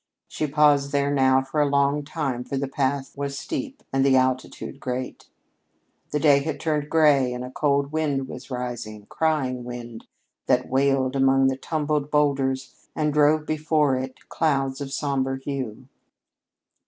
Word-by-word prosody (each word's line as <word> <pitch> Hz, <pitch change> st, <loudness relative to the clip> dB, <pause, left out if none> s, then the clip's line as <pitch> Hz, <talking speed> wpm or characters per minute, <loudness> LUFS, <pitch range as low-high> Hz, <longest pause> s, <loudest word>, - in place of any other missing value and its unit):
She 155 Hz, -, -3 dB
paused 145 Hz, -1 st, +3 dB
there 140 Hz, 0 st, +1 dB
now 130 Hz, -1 st, +4 dB
for 135 Hz, +3 st, -1 dB
a 145 Hz, -, +3 dB
long 140 Hz, +1 st, +2 dB
time, 140 Hz, -5 st, -3 dB
for 135 Hz, -, -4 dB
the 140 Hz, 0 st, -1 dB
path 135 Hz, 0 st, -2 dB
was 140 Hz, -1 st, -4 dB
steep 285 Hz, -, -5 dB
and 135 Hz, 0 st, +3 dB
the 135 Hz, -1 st, +4 dB
altitude 130 Hz, +1 st, -1 dB
great. 130 Hz, -1 st, -5 dB, 0.8 s
The 150 Hz, -, -1 dB
day 145 Hz, -2 st, +5 dB
had 150 Hz, +1 st, -4 dB
turned 150 Hz, -2 st, -1 dB
gray 145 Hz, -5 st, +4 dB
and 125 Hz, -, -5 dB
a 125 Hz, -, -7 dB
cold 140 Hz, 0 st, +1 dB
wind 145 Hz, -4 st, -1 dB
was -, -, -9 dB
arising 120 Hz, -5 st, -5 dB
crying 135 Hz, -6 st, 0 dB
wind, 120 Hz, -2 st, -8 dB, 0.4 s
that 125 Hz, 0 st, +2 dB
wailed 135 Hz, 0 st, +2 dB
among 135 Hz, 0 st, +4 dB
the 135 Hz, -, -1 dB
tumbled 150 Hz, 0 st, -2 dB
boulders 135 Hz, -3 st, +1 dB, 0.2 s
and 150 Hz, -1 st, 0 dB
drove 150 Hz, +1 st, +3 dB
before 155 Hz, -2 st, +1 dB
it 130 Hz, 0 st, -6 dB
clouds 135 Hz, -4 st, 0 dB
of 135 Hz, -1 st, -5 dB
somber 135 Hz, -2 st, -1 dB
hue. 130 Hz, -3 st, -5 dB
140 Hz, 155 wpm, -24 LUFS, 130-150 Hz, 0.8 s, day